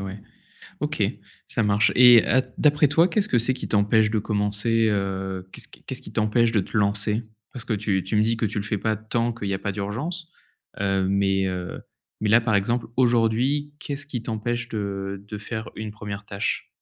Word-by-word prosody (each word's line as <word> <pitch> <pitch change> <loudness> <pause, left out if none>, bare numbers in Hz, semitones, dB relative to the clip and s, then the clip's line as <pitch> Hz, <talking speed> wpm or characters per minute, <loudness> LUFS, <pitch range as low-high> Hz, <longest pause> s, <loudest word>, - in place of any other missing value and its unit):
ouais. 100 +1 -6 0.6
OK, - - -2 0.5
ça 115 - 0
marche, 105 0 +3
et 125 -2 +8
à 130 +2 +3 0.2
d'après 150 0 +4
toi, 165 +5 +4
qu'est-ce 205 +2 0
que 125 - +2
c'est 120 +3 +2
qui - - -6
t'empêche 105 +1 +3
de 110 - +1
commencer, 105 +2 +1
heu, 95 -2 -2
qu'est-ce - - -10
qui - - -17
qu'est-ce - - -6
qui - - -11
t'empêche 115 +2 +2
de 110 - +2
te 95 - -3
lancer? 105 +2 +1 0.3
Parce 125 -2 -6
que 115 - -1
tu 100 -3 0
tu 95 +3 -3
me 105 - +4
dis 115 +1 +1
que 115 - 0
tu 105 0 -2
le - - -3
fais 105 - -1
pas 110 +2 0
tant, 115 +2 -1
qu'il 110 -3 -5
y 100 - -1
a 95 - -2
pas 100 - -2
d'urgence. 130 - -4 0.5
Heu, 95 -1 +1
mais, 95 0 +2
heu, 90 -1 -5 0.4
mais 105 - +1
là, 115 +3 +7
par 115 -2 0
exemple, 115 +4 0
aujourd'hui, 125 +4 +2
qu'est-ce 145 0 -5
qui 130 -4 -5
t'empêche 120 +1 -3
de 100 -2 -4
de 105 0 -6
faire 110 +1 -6
une 110 -1 -5
1re 105 -1 -7
tâche? 100 -1 -2
110 Hz, 205 wpm, -24 LUFS, 100-120 Hz, 0.6 s, et